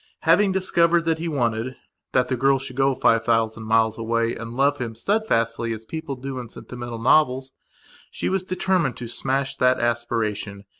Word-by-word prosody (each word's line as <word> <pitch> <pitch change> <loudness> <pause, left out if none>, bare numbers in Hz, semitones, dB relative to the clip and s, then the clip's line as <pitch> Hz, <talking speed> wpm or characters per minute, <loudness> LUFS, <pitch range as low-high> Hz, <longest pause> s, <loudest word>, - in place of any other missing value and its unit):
Having 190 +4 +4
discovered 170 -2 +2
what 165 -1 +1
he 170 - -3
wantedthat 125 -1 -2
the 130 - 0
girl 135 +2 +3
should 130 -1 -6
go 135 0 +2
five 115 -2 +3
thousand 115 -1 0
miles 110 0 +2
away 115 0 0
and 115 +1 -7
love 140 +1 +2
him 115 -3 -4
steadfastly 115 - 0
as 110 0 -8
people 160 0 -5
do 130 0 -6
in 120 -2 -8
sentimental 120 0 -8
novels, 130 +1 +3 0.6
she - - -4
was 190 0 0
determined 185 -7 0
to 120 - -6
smash 135 +3 -1
that 125 0 +3
aspiration. 110 -4 -2
125 Hz, 165 wpm, -23 LUFS, 115-145 Hz, 0.6 s, Having